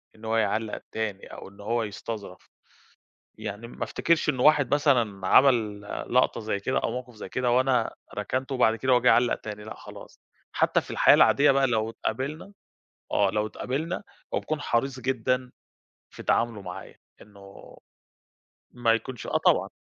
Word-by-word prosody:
إن 110 +1 -13
هو 115 0 0
يعلق 110 -1 -1
تاني 105 -3 -4
أو - - -9
إن 100 - -20
هو 115 +2 -1
يستظرف. 105 -2 -7 0.9
يعني 105 +4 -6
ما - - -5
افتكرش 165 -2 0
إن 130 -4 +1
واحد 145 -1 +4
مثلًا 120 -10 +1
عمل 115 -6 +4 0.3
لقطة 125 - +3
زي 105 -2 -2
كده 130 +6 0
أو - - -1
موقف 125 -1 -6
زي 105 - -8
كده 125 -1 -1
وأنا 125 -1 +2 0.2
ركنته، 130 +6 -3
وبعد 115 -3 +3
كده 130 +2 0
هو 120 - +5
جه 125 - +5
علّق 120 0 +3
تاني، 105 -1 -8
لأ 110 - -8
خلاص. - - -13 0.3
حتى - - +2
في - - -13
الحياة - - +6
العادية 145 +1 +5
بقى 135 0 +3
لو 110 -2 0
اتقابلنا 150 - -4 0.6
آه 100 -2 +3
لو 105 +1 0
تقابلنا، 150 - -4 0.3
هو - - +1
بيكون 155 -1 -3
حريص 130 +2 -1
جدًا 125 0 -1 0.6
في - - -10
تعامله 115 -3 0
معايا 90 -1 -9 0.3
إنه 100 -1 -15 0.9
ما 120 -2 +1
يكونش 115 0 -3
آه - - +1
طبعًا. - - +4
120 Hz, 165 wpm, -26 LUFS, 105-130 Hz, 0.9 s, الحياة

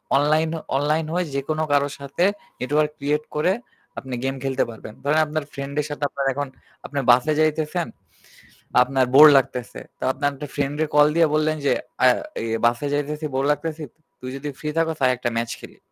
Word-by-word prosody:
Online 155 +3 +3 0.3
online 150 +3 +1
হয়ে 180 +1 0
যেকোনো 155 +3 -1
কারো 145 0 +3
সাথে 140 +5 -2 0.4
নেটওয়র্ক 150 +4 +1
ক্রিয়েট 150 +2 0
করে 165 +5 +2 0.5
আপনি 130 -1 -8
গেম 135 0 -1
খেলতে 135 -1 +1
পারবেন। 110 -1 -10
ধরেন 150 +3 +2
আপনার 155 0 -2
ফ্রেন্ড 140 0 -6
এর - - -5
সাথে 145 0 -5
আপনার 140 0 -3
এখন 145 +2 -3 0.4
আপনি 145 - -3
বাসে 130 +6 +3
যাইতেছেন। 155 +2 0 1.0
আপনার 130 0 +1
বোর 150 +2 +11
লাগতেছে। 125 -2 -2 0.2
তো - - -6
আপনার 145 +2 0
একটা 145 +2 -7
ফ্রেন্ডরে 145 +2 0
কল 150 0 +7
দিয়ে 165 -1 +5
বললেন 155 0 +1
যে - - +3 0.3
আ - - +7 0.4
এ - - -3 0.2
বাসে 120 +4 +1
যাইতেছি 150 +2 -2
বোর 135 - +1
লাগতেছি। 160 +1 -3 0.4
তুই 130 - -7
যদি 145 +2 -5
ফ্রি 150 - -3
থাকোস 160 -1 +1
আয় 130 - +4
একটা 120 0 -1
ম্যাচ 115 0 -1
খেলি - - -13
145 Hz, 180 wpm, -23 LUFS, 135-155 Hz, 1.0 s, বোর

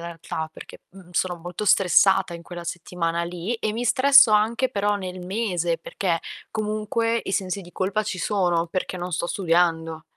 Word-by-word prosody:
realtà, 165 -1 -5
perché, - - -12
mhmm, 180 -1 -15
sono 175 0 0
molto 175 +5 -6
stressata 190 -1 +4
in 170 - -9
quella 175 0 -8
settimana 170 -1 -3
lì 175 +5 -4
e 215 - -2
mi 240 +2 -2
stresso 275 0 +6
anche 225 +5 +2
però 205 0 0
nel 185 -2 -6
mese, 180 -4 -1
perché 175 -4 -2 0.3
comunque 220 +2 -1
i 195 - -4
sensi 190 +1 -1
di 175 -1 -13
colpa 200 +3 -1
ci 205 -3 -4
sono, 175 -5 +1
perché 185 +1 -3
non 180 0 -5
sto 170 +1 -1
studiando. 165 -3 0
185 Hz, 170 wpm, -24 LUFS, 170-210 Hz, 0.3 s, stresso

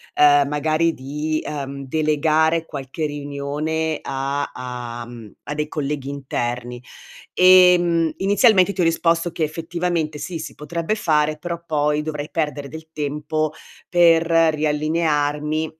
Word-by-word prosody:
ehm, 145 -1 +5
magari 155 +3 +1
di, 150 +4 -3
ehm, 140 -1 -5
delegare 155 +2 +1
qualche 140 +1 -5
riunione 145 +2 -3
a 140 +1 -3
a 120 -2 -6
mhmm, 115 -3 -11
a - - -5
dei 150 0 -2
colleghi 145 -3 -3
interni: 125 -3 -4 0.5
ehm, 180 -3 +5
inizialmente 200 -1 +4
ti 185 - -2
ho - - +3
risposto 165 0 +1
che 160 - -2
effettivamente, 165 0 -2
sì, 165 +2 -5
si 155 - -7
potrebbe 170 +6 -3
fare, 155 -6 +1
però 170 +1 -5
poi 150 -1 +1
dovrei 150 -1 -5
perdere 150 -3 -2
del 160 +1 -10
tempo 150 +1 -2 0.4
per 170 -2 +5
riallinearmi 155 -1 +1
155 Hz, 125 wpm, -21 LUFS, 145-165 Hz, 0.5 s, ehm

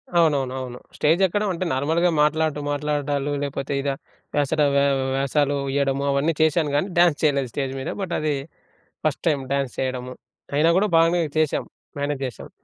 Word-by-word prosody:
అవునవును. 145 -6 +3
అవును. 125 -1 -6 0.2
స్టేజ్ 165 +5 +3
ఎక్కడం 205 +4 -1
అంటే 180 +2 -3
నార్మల్‌గా 160 +6 +2
మాట్లాడుతూ 155 0 +1
మాట్లాడడాలు, 145 -1 -1
లేకపోతే 140 0 -3
ఇగ, 140 - -1 0.5
వేసట 145 +1 +1
వే 140 - +4 0.3
వేషాలు 140 +1 +1 0.2
ఇయ్యడము 140 0 +1
అవన్నీ 140 +4 +1
చేశాను. 155 -1 +2
కానీ 165 +7 +1
డ్యాన్స్ 175 -4 +4
చేయలేదు 140 -4 +2
స్టేజ్ 135 -2 -2
మీద. 130 - -4
బట్ 185 -3 -3
అది 155 -1 0 0.7
ఫస్ట్ 150 - -1
టైమ్ 140 -4 0
డ్యాన్స్ 140 -2 -1
చేయడము. 125 -1 -3 0.4
అయినా 160 +3 +4
కూడా 210 +1 +2
బాగానే 170 +1 +3 0.2
చేశాం. 155 -2 +1 0.3
మేనేజ్ 145 -1 -2
చేశాం. 125 - -9
145 Hz, 155 wpm, -23 LUFS, 140-160 Hz, 0.7 s, వే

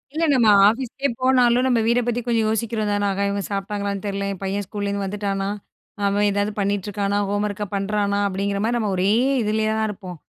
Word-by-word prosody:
இல்லங்க. 315 -5 +2
நா 210 - +7 0.2
ஆபீஸ்க்கே 260 +4 -2
போனாலும் 250 -1 +4
நம்ம 245 -3 +3
வீடப் 240 0 +2
பத்தி 240 0 0
கொஞ்சம் 230 -2 +2
யோசிக்கிறோம் 220 -1 -1
தானே? 205 0 0
ஆஹா 200 +1 -1
இவுங்க 200 0 -2
சாப்பிட்டாங்களான்னு 200 0 -3
தெரியல, 200 0 -2
என் 190 - -11
பையன் 195 +1 -2
ஸ்கூல 205 +1 -4
இருந்து 200 0 -2
வந்துட்டானா? 195 0 -2 0.6
அவன் 200 +1 +2
ஏதாவது 205 +1 0
பண்ணிட்டு 200 0 -1
இருக்கானா? 200 0 -1
ஹோம்வொர்க்க 205 0 -2
பண்றானா? 200 0 0
அப்டிங்கிற 200 +1 -2
மாரி 235 +2 +1
நம்ம 215 -3 -1
ஒரே 185 +2 +2 0.3
இதுல 215 +1 0
தான் 220 - +1
இருப்போம். 185 -4 -8
205 Hz, 185 wpm, -22 LUFS, 200-225 Hz, 0.6 s, நா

